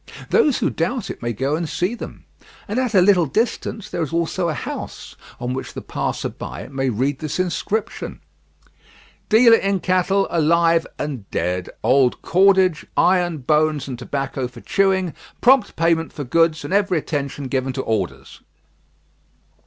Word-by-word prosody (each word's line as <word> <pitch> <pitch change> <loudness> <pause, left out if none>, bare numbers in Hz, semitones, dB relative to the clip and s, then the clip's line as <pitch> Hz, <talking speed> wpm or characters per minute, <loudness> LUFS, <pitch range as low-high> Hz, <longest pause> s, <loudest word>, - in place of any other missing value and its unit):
Those 305 - +4
who - - 0
doubt 205 +10 -2
it - - -10
may 120 0 -2
go 135 +6 -1
and 165 -1 -3
see 180 +6 -1
them; 240 - -9 0.4
and 215 +4 -1
at 250 -4 -1
a 185 - +7
little 180 -4 +4
distance, 220 - -2
there 170 - -4
is 160 - -2
also 170 +1 0
a 155 - -2
house - - -6 0.2
on 125 +1 -3
which 130 - -6
the - - -5
passer - - -2
by - - -8
may 135 -1 -1
read 130 +5 -1
this 155 +2 -4
inscription: 185 +5 -2 1.1
"DEALER 230 +1 +7
IN 195 -2 0
CATTLE, 185 +2 +1
ALIVE 165 +1 +3
AND 135 -9 -5
DEAD, 90 +1 -2
OLD 130 -2 +3
CORDAGE, 190 -2 +3
IRON, 175 -2 +3
BONES, 155 -1 +2
AND 125 -2 -5
TOBACCO 135 0 -3
FOR 120 -1 -13
CHEWING, 190 -3 +1 0.3
PROMPT 255 -3 +4
PAYMENT 165 0 +1
FOR 145 - -6
GOODS, 160 +4 +2
AND - - -4
EVERY 200 -3 +2
ATTENTION 140 -2 -3
GIVEN 130 0 -1
TO 130 - -3
ORDERS." 85 -12 -3
165 Hz, 160 wpm, -21 LUFS, 135-190 Hz, 1.1 s, a